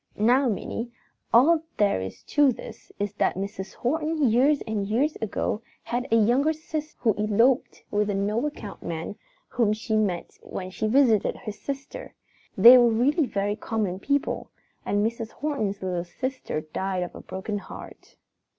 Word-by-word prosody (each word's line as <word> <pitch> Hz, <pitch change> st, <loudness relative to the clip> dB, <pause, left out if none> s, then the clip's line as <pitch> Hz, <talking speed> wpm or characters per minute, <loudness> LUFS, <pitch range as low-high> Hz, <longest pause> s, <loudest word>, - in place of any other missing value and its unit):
Now, 245 Hz, +5 st, +4 dB
Minnie, 230 Hz, +3 st, -4 dB, 0.4 s
all 310 Hz, +8 st, +6 dB, 0.2 s
there 200 Hz, -, +2 dB
is 95 Hz, -, -7 dB
to 290 Hz, -3 st, +3 dB
this -, -, -10 dB
is 205 Hz, -1 st, -2 dB
that -, -, +2 dB
Mrs. 195 Hz, 0 st, -5 dB
Horton 305 Hz, 0 st, 0 dB
years 275 Hz, +5 st, +3 dB
and 210 Hz, -2 st, -2 dB
years 265 Hz, +9 st, +1 dB
ago 220 Hz, 0 st, -2 dB, 0.2 s
had 245 Hz, +2 st, -2 dB
a -, -, +5 dB
younger 245 Hz, +8 st, +3 dB
sister 310 Hz, -1 st, -6 dB
who 225 Hz, -3 st, +3 dB
eloped 230 Hz, +5 st, +2 dB
with 210 Hz, 0 st, +1 dB
a 200 Hz, -, 0 dB
no 210 Hz, +7 st, 0 dB
account 215 Hz, -9 st, -8 dB
man 165 Hz, +4 st, -5 dB, 0.3 s
whom 220 Hz, -4 st, +2 dB
she 220 Hz, +1 st, -2 dB
met 195 Hz, -5 st, -1 dB
when 185 Hz, 0 st, -6 dB
she 215 Hz, +3 st, -2 dB
visited 230 Hz, -3 st, +3 dB
his 215 Hz, -4 st, -7 dB
sister. 280 Hz, -, -6 dB, 0.4 s
They 250 Hz, +2 st, +10 dB
were 240 Hz, -1 st, +5 dB
really 265 Hz, +7 st, +2 dB
very 205 Hz, -1 st, -1 dB
common 210 Hz, -4 st, -2 dB
people, 280 Hz, +6 st, -1 dB, 0.4 s
and 205 Hz, +1 st, +2 dB
Mrs. 225 Hz, 0 st, -3 dB
Horton's 220 Hz, -10 st, -2 dB
little 180 Hz, -2 st, -1 dB
sister 255 Hz, -, -4 dB
died 185 Hz, +4 st, -3 dB
of 175 Hz, -, -7 dB
a -, -, -9 dB
broken 205 Hz, +2 st, -4 dB
heart. -, -, -12 dB
220 Hz, 160 wpm, -26 LUFS, 200-265 Hz, 0.4 s, They